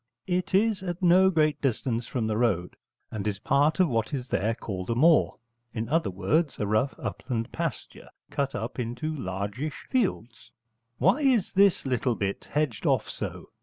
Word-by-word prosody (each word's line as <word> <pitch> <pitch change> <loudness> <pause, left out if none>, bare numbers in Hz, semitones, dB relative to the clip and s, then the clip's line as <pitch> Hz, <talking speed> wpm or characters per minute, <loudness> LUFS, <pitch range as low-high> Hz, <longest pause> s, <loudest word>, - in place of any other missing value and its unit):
It 180 +1 -1
is 210 0 +2
at 180 -1 -5
no 185 +2 +6
great 155 -4 +1
distance 120 -3 -1
from 120 -4 -2
the 110 -1 -1
road, 105 -7 0 0.4
and 105 -1 -3
is 100 -1 -1
part 145 - +2
of 185 - +5
what 115 0 -1
is 125 -2 -5
there 110 +3 0
called 95 -5 -6
a 115 - +1
moor, 155 +5 +4 0.4
in 110 0 -2
other 165 -3 +1
words, 120 - 0
a 105 - -1
rough 110 +7 +1
upland 120 -2 -4
pasture 165 -2 -5 0.2
cut 140 -2 -1
up - - -4
into 125 +6 -3
largish 100 +6 -4
fields. 155 - -1 0.5
'Why 195 - +3
is 255 -9 +2
this 195 -4 +4
little 125 -2 0
bit 100 -1 -3
hedged 145 -8 -1
off - - +2
so?' - - -6
135 Hz, 170 wpm, -27 LUFS, 110-170 Hz, 0.5 s, no